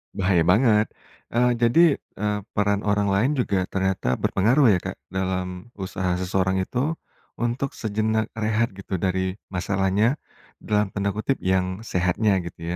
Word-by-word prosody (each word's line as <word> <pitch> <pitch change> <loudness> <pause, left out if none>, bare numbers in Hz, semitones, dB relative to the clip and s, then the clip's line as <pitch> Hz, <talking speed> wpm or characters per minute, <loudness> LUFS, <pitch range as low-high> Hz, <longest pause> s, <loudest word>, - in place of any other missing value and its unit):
Bahaya 95 -4 +2
banget. 105 +2 +4 0.5
Eee, 125 +1 +3
jadi, 120 +8 +4 0.4
eee, 105 0 -1 0.2
peran 100 -1 +2
orang 105 0 +2
lain 110 +9 +2
juga 100 -8 0
ternyata 95 -10 0
berpengaruh 120 +5 +3
ya, 90 - +3
Kak, - - -6 0.2
dalam 95 +1 -3
usaha 95 -2 -2
seseorang 95 +1 0
itu 135 +11 -1 0.4
untuk 120 +3 -2
sejenak 110 0 -1
rehat 110 0 0
gitu, 95 0 -5
dari 95 +1 -1 0.2
masalahnya, 100 +6 +1 0.5
dalam 105 -1 +1
tanda 100 0 -1
kutip, 110 +6 -1
"Yang 95 +2 0
sehatnya," 95 +3 +2
gitu 85 -1 -9
100 Hz, 135 wpm, -24 LUFS, 95-110 Hz, 0.5 s, banget